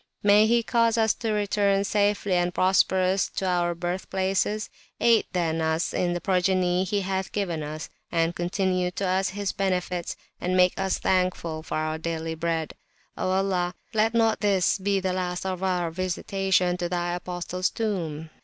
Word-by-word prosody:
May 205 +1 +6
He 235 +1 +3
cause 230 0 +2
us 220 -2 +3
to 225 -2 -3
return 205 -1 +1
safe 205 0 +1
and 180 -2 +1
prosperous 185 +1 +2
to 195 - -1
our 175 -1 +1
Birth 175 +2 -4
places; 195 +3 0 0.3
aid 230 -2 +4
then 165 -3 0
us 160 +1 0
in 175 -1 0
the 175 - -2
Progeny 185 0 +1
he 200 +2 0
hath 190 0 -2
given 175 -6 -2
us, 155 +1 -5 0.2
and 165 0 +1
continue 180 0 0
to 195 +2 -3
us 190 +1 +1
his 200 -1 -3
Benefits, 180 -2 -2 0.2
and 185 +1 0
make 180 0 +5
us 195 -1 0
thankful 180 -4 0
for 155 - -4
our 155 0 -2
daily 160 0 -3
Bread! 160 -1 -2 0.4
O - - -2
Allah, 185 -2 0 0.2
let 220 +1 +2
not 225 -1 +3
this 195 -2 +2
be 195 +1 +1
the 185 -1 -1
last 180 0 -3
of 185 -1 -3
our 180 -3 0
Visitations 185 +1 0
to 175 -1 -2
Thy 175 0 -1
Apostle's 180 0 -2
Tomb! 165 -8 -3
185 Hz, 170 wpm, -26 LUFS, 175-195 Hz, 0.4 s, May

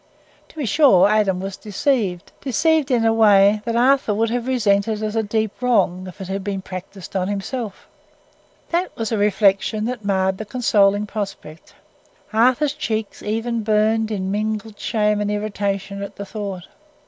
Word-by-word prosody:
To - - -19
be 300 -4 -3
sure, 210 - +5
Adam 205 -3 +2
was 195 0 -5
deceived—deceived 260 - 0
in 240 -3 +2
a 225 - +4
way 210 -1 +5
that 230 -1 -1
Arthur 250 -3 +3
would 225 +1 0
have 245 0 -2
resented 215 -3 +1
as 215 0 -2
a 225 - +2
deep 220 +1 -2
wrong 190 -7 +1
if 185 - -11
it 190 - -6
had 195 +1 -3
been 195 -1 -3
practised 185 +1 -9
on 185 -1 0
himself. 205 +1 -4 0.9
That 350 +2 0
was 225 -1 -3
a 225 - +1
reflection 205 +1 +2
that 240 -2 -4
marred 190 -1 0
the 215 - -5
consoling 205 -3 +2
prospect. 200 -7 -7 0.6
Arthur's 255 +6 +3
cheeks 220 -8 -4
even 225 +2 -2
burned 220 +1 +2
in 190 -3 -2
mingled 215 +1 -3
shame 210 -1 0
and 205 - -1
irritation 200 -1 -3
at 200 - -7
the 200 - -6
thought. 195 -3 -6
210 Hz, 160 wpm, -21 LUFS, 195-225 Hz, 0.9 s, sure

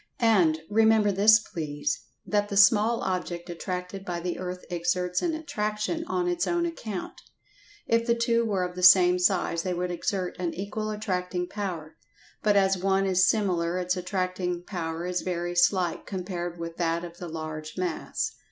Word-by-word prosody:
And, 185 -10 +3
remember 220 0 +4
this 210 +3 +6
please, 150 -8 -3 0.3
that 205 -1 0
the 200 - -2
small 220 +2 +5
object 175 -1 -3
attracted 180 +2 -5
by 175 -3 -3
the 175 0 -4
earth 180 0 -5
exerts 180 +1 0
an 335 -2 0
attraction 285 0 -2
on 360 -1 -1
its 350 -1 0
own 345 0 +1
account. 220 - -6 0.6
If 230 +1 +1
the 235 - +3
two 235 0 +2
were 200 -5 0
of 180 0 -4
the 180 - -5
same 180 0 +7
size 180 -2 +1
they 180 0 -2
would 180 +1 -2
exert 180 +1 -2
an 175 -2 -2
equal 205 +3 -4
attracting 180 -4 -2
power, 175 -7 -5 0.4
but 210 -1 +3
as 195 -1 +3
one 195 +1 +2
is 185 -1 +4
smaller 180 -5 0
its 180 0 0
attracting 180 -1 -2
power 170 -3 -4
is 180 0 -1
very 175 -1 -3
slight 175 0 +2
compared 175 -2 -4
with 165 0 -6
that 170 0 0
of 170 0 -9
the 175 - -6
large 155 -1 -6
mass. 180 -3 -2
185 Hz, 170 wpm, -27 LUFS, 175-210 Hz, 0.6 s, same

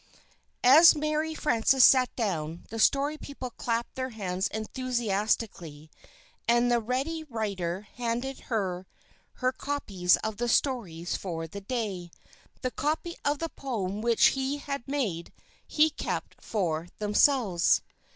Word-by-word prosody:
As 310 +8 +8
Mary 305 +1 -1
Frances 260 -2 +4
sat 255 -2 +6
down, 170 -7 -2
the 225 - -5
Story 285 +6 +2
People 260 -3 -7
clapped 235 0 -2
their 260 0 -3
hands 190 -4 -2
enthusiastically; 215 - -2 0.6
and 240 +1 +3
the 240 - +4
Ready 270 +8 -2
Writer 200 - -3
handed 240 +4 -4
her 190 -5 -2 0.5
her 255 0 0
copies 205 -11 +1
of 220 -1 -3
the 240 0 -1
stories 195 - 0
for 165 -4 -4
the 200 +5 -8
day. 200 -6 -3 0.5
The 255 - -1
copy 320 +5 -2
of 290 +1 +1
the 330 +2 -3
poem 210 -9 -4
which 230 0 +5
he 270 +1 -2
had 280 -3 -5
made, 220 - -2 0.4
he 310 +1 +3
kept - - -5
for 170 -6 -1
themselves. 210 -3 +3
235 Hz, 130 wpm, -28 LUFS, 195-270 Hz, 0.6 s, As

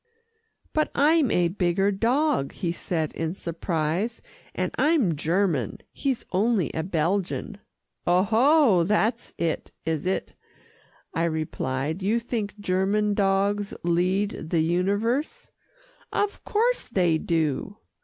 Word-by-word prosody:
"But 310 0 +1
I'm 300 -1 +4
a 175 -3 +2
bigger 185 +2 +1
dog," 240 - +1
he 175 -4 -2
said 165 -2 -2
in 165 +2 -3
surprise, 170 +4 -2 0.3
"and - - -1
I'm 290 - +2
German. 160 - 0
He's 270 -4 -2
only 200 -1 +1
a 160 - -1
Belgian." 180 +4 -1 0.5
"Oho! 220 - +4
that's 215 +5 0
it, 165 -2 -2
is 160 +1 -1
it?" 190 - -2 0.8
I 165 - +1
replied. 155 -1 -2
"You 210 +5 +2
think 220 -3 -4
German 205 +2 +1
dogs 200 +1 +1
lead 180 +2 0
the 165 -1 +2
universe." 205 - 0 0.6
"Of 410 0 -1
course 475 +4 +1
they 175 -7 +2
do." 165 +5 -1
195 Hz, 115 wpm, -25 LUFS, 170-225 Hz, 0.8 s, I'm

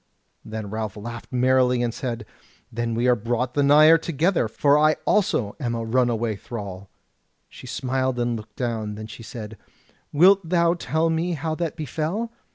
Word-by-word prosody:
Then 110 -2 -6
Ralph 110 -2 -4
laughed 120 +3 -8
merrily, 125 -1 +3
and 120 -1 -1
said, 120 -4 -4 0.5
"Then 115 0 -2
are 120 +2 +3
we 115 - -4
brought 120 +2 -1
the 145 - +1
nigher 155 +3 +7
together, 165 - 0
for 140 +6 +2
I 155 +1 +4
also 130 - +1
am 120 -4 -2
a 115 -1 -3
runaway 115 -2 0
thrall." 100 -4 -7 0.6
She - - -13
smiled 130 -1 -1
and 120 0 0
looked 110 -1 -9
down: 110 -4 -3
then 110 +1 -7
she 110 - -10
said: 110 -1 -8 0.5
"Wilt 190 +6 +6
thou 170 -1 +3
tell 165 -1 0
me 170 +2 0
how 160 +1 -3
that 165 -1 -3
befell?" 165 - -3
125 Hz, 165 wpm, -24 LUFS, 115-155 Hz, 0.6 s, nigher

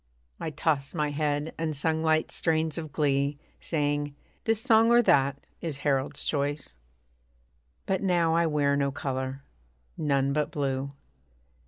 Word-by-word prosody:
I - - -3
tossed 150 -1 -1
my 150 -2 0
head, 145 +1 -1
and 160 -2 -1
sung 160 +2 0
light 160 0 +2
strains 160 -1 0
of 155 -2 -7
glee 140 -1 +1 0.2
Saying, 145 -2 -1 0.3
'This 225 -1 +2
song, 225 -1 +4
or 240 0 +6
that, 140 -5 +2 0.2
is 160 -5 -3
Harold's 135 -1 +1
choice.' 145 - -2 1.1
But 190 - 0
now 175 -4 +2
I 170 0 +3
wear 145 -2 +2
no 140 -1 +1
colour 130 0 -4 0.6
none 140 -2 +1
but 150 0 0
blue. 135 -1 -2
145 Hz, 140 wpm, -28 LUFS, 140-160 Hz, 1.1 s, or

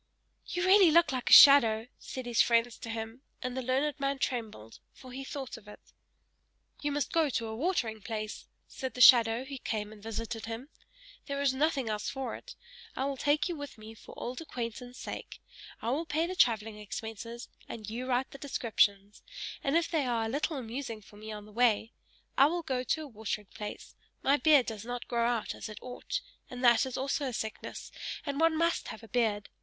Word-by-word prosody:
"You 355 0 -1
really 380 -1 +7
look 335 0 +5
like 255 -2 -2
a - - +7
shadow!" 230 -6 +9
said 260 -1 -7
his 240 -2 +3
friends 235 0 +2
to 230 - -7
him; 225 +2 -5 0.2
and 250 0 -3
the 260 - -2
learned 270 +4 0
man 275 0 0
trembled, 220 - -4
for 255 - -13
he 265 +2 -6
thought 270 -3 -6
of 215 -2 -16
it. 210 - -11 1.0
"You 290 - -1
must 290 0 -1
go 325 -3 +3
to 230 -3 -1
a 220 0 -5
watering 235 - -1
place!" 215 0 -5 0.2
said 260 -1 -6
the - - -6
shadow, 235 0 +7
who 270 -1 -7
came 210 -3 -3
and 210 - -15
visited 225 +1 -5
him. 230 +5 -6 0.6
"There 280 -1 -3
is 280 -2 +2
nothing 275 -2 +1
else 210 -1 -2
for 270 -1 -4
it! - - -11 0.4
I 265 - -1
will 280 0 -1
take 290 +5 +1
you 350 - -3
with 285 -4 -8
me 215 +1 -10
for 225 - -14
old 250 +5 -5
acquaintance' 245 -3 -6
sake; - - -7 0.4
I 230 - 0
will 315 +5 -1
pay 320 +2 +1
the 365 - -3
travelling 220 - +2
expenses, 225 +3 -7 0.2
and 215 -3 -7
you 240 +4 -4
write 255 +1 0
the 275 - -10
descriptions 205 -7 +1 0.4
and 275 +4 +2
if 335 - +1
they 305 -6 +1
are 230 -2 0
a - - -2
little 290 +4 -1
amusing 235 -2 -5
for 205 - -16
me 215 +1 -8
on 210 -1 -7
the 210 - -15
way! 230 -1 +2 0.5
I 275 - +8
will 340 +2 -2
go 260 -5 -1
to 315 +4 -1
a - - -8
watering 215 -4 -5
place 210 -1 -7 0.3
my 280 +2 +4
beard 290 -4 +5
does 220 -2 -5
not 245 +1 -5
grow 235 -1 +1
out 240 -2 -1
as - - -7
it 215 - -9
ought 255 - -5 0.3
that 245 -1 +4
is 260 - -5
also 275 +2 -1
a 255 - -3
sickness 220 0 -5 0.3
and 280 -1 -2
one 325 -1 +4
must 335 +1 +1
have 220 - -8
a - - -11
beard! 220 -4 0
245 Hz, 205 wpm, -31 LUFS, 225-280 Hz, 1.0 s, shadow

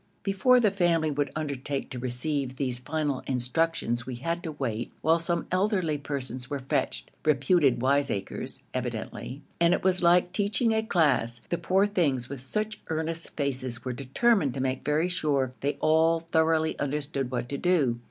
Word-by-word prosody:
Before 230 +6 +4
the 215 -4 +3
family 170 -5 +2
would 145 0 -1
undertake 140 -2 -3
to 125 - -5
receive 130 +2 -2
these 130 -4 -1
final 145 0 -1
instructions 125 -1 0
we 130 - -4
had 170 +7 -2
to 160 -3 -5
wait 120 -5 -3
while 165 +2 +4
some 170 0 -1
elderly 185 -5 +1
persons 130 -3 -5
were 145 - -2
fetched, 65 - -1
reputed 140 -3 +3
wiseacres 135 -7 -1
evidently, 135 +4 -5 0.2
and 170 +1 +5
it - - -5
was 185 -1 +2
like 175 +1 +4
teaching 210 +3 +1
a 220 - +2
class. 140 - +1
The 175 - -1
poor 190 +2 +3
things, 145 -12 0
with 140 -1 -5
such 215 +12 -3
earnest 160 +1 -3
faces, 130 -4 -2
were 130 - -2
determined 140 - +1
to - - -3
make 130 0 -1
very 150 +4 +1
sure 145 -8 0
they 145 +1 -1
all 160 +1 +4
thoroughly 160 -1 +1
understood 140 -2 -2
what 120 -1 -3
to 140 - -3
do. 145 -10 +2
150 Hz, 165 wpm, -27 LUFS, 130-170 Hz, 0.2 s, and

